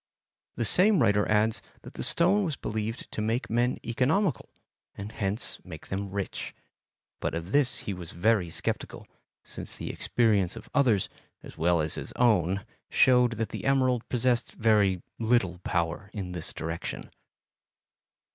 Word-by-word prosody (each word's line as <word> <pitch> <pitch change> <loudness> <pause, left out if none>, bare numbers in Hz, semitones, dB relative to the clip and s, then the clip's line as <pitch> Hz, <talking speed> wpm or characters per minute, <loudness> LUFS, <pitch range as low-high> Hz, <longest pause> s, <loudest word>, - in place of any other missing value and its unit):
The 120 - -1
same 190 - +5
writer 105 -4 +3
adds 105 +1 +3 0.2
that - - -11
the - - -6
stone 195 +5 +2
was 160 -6 -1
believed 110 0 -4
to - - -3
make 115 +3 -1
men 120 +2 +2
economical 145 - +1 0.5
and 100 +1 -7
hence 100 +1 -2
to - - -24
make 80 -4 -9
them 100 +1 -3
rich, 100 0 -4 0.6
but - - -2
of 85 +3 -5
this 140 -1 +3
he 100 - -2
was 90 -3 -7
very 95 0 +1
sceptical, - - -4 0.4
since - - -5
the - - -4
experience 105 -6 +1
of 125 - -11
others 120 -10 +3 0.4
as - - -11
well 85 0 +2
as 75 0 0
his - - -5
own 100 -5 +2 0.2
showed 125 -2 +5
that 115 -1 -2
the - - -6
emerald 130 -3 +2
possessed 125 -1 +1
very 105 -5 +2 0.2
little 110 -6 +1
power 85 +2 -2
in 95 -4 -5
this 90 -3 -4
direction. 80 +1 -5
110 Hz, 155 wpm, -28 LUFS, 95-125 Hz, 0.6 s, same